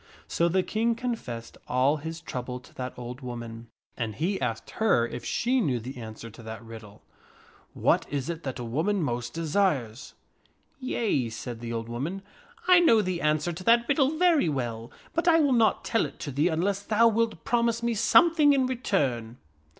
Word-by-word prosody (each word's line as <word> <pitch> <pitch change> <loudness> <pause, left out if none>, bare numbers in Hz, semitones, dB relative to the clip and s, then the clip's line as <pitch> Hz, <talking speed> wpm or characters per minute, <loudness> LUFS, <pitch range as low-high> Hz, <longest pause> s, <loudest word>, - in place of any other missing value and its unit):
So 170 0 +1
the 185 +2 +2
King 230 +3 0
confessed 225 - -5
all 130 +4 +2
his 160 +2 -6
trouble 125 -5 -5
to - - -18
that 125 0 -6
old 125 +2 -7
woman, 120 -2 -7 0.3
and 110 -3 -3
he 180 - -1
asked - - -3
her 215 - +2
if 120 - -7
she 250 +2 +1
knew 130 - 0
the 125 +4 -8
answer 110 0 -8
to 115 - -13
that 110 0 -8
riddle, 110 -2 -12 0.4
" - - -26 0.2
What - - +2
is 140 -2 -3
it 170 -1 -4
that 135 -4 -5
a 125 - -5
woman 160 - 0
most 120 -2 -3
desires? 155 - -1 0.3
" - - -39
44 255 -1 -5
Yea," 135 - +1
said 115 +1 -6
the 115 0 -6
old 115 -1 -3
woman, 150 +12 -4 0.2
" 475 -4 -23
I 365 -1 +8
know 230 -11 +5
the 180 -2 -2
answer 155 +3 +1
to 180 +3 -8
that 235 +1 +4
riddle 280 +2 +2
very 330 - +4
well, 120 -5 -3 0.2
but 335 +1 -1
I 330 -1 +6
will 285 -4 +3
not 230 -3 +2
tell 225 - +1
it - - -15
to 145 - -4
thee 145 +5 +2
unless 185 +4 0
thou 215 +3 +4
wilt 225 -6 0
promise 235 -1 +1
me 235 0 +1
something 295 +7 +5
in 265 -2 +2
return." 140 - -1
160 Hz, 195 wpm, -27 LUFS, -, 0.4 s, I